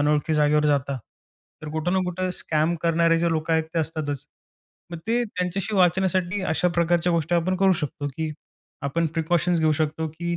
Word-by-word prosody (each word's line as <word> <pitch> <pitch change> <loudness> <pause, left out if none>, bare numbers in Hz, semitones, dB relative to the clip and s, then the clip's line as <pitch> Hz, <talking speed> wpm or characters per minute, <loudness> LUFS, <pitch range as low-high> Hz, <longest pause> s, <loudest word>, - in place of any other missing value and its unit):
अनोळखी 150 +1 +2
जागेवर 150 0 +3
जाता, 140 -2 +1 0.7
तर 155 - -6
कुठं 160 +3 -1
ना 190 - +3
कुठं 180 +1 -2
स्कॅम 160 +1 0
करणारे 165 0 +3
जे 170 0 +1
लोक 160 +1 -2
आहेत, 160 0 +3
ते - - +2
असतातच. 145 -3 -3 0.6
मग 170 - -5
ते 240 +2 +2
त्यांच्याशी 195 +1 -3
वाचण्यासाठी 185 +1 +2
अशा 180 0 +1
प्रकारच्या 170 +1 +2
गोष्टी 165 +1 0
आपण 180 +2 +1
करू 190 0 +4
शकतो, 145 0 -3
की 160 -1 -2 0.5
आपण 165 +4 0
प्रिकॉशन्स 170 +1 +1
घेऊ 155 -1 +3
शकतो, 155 +1 -2
की 170 +2 -3
165 Hz, 175 wpm, -24 LUFS, 155-180 Hz, 0.7 s, करू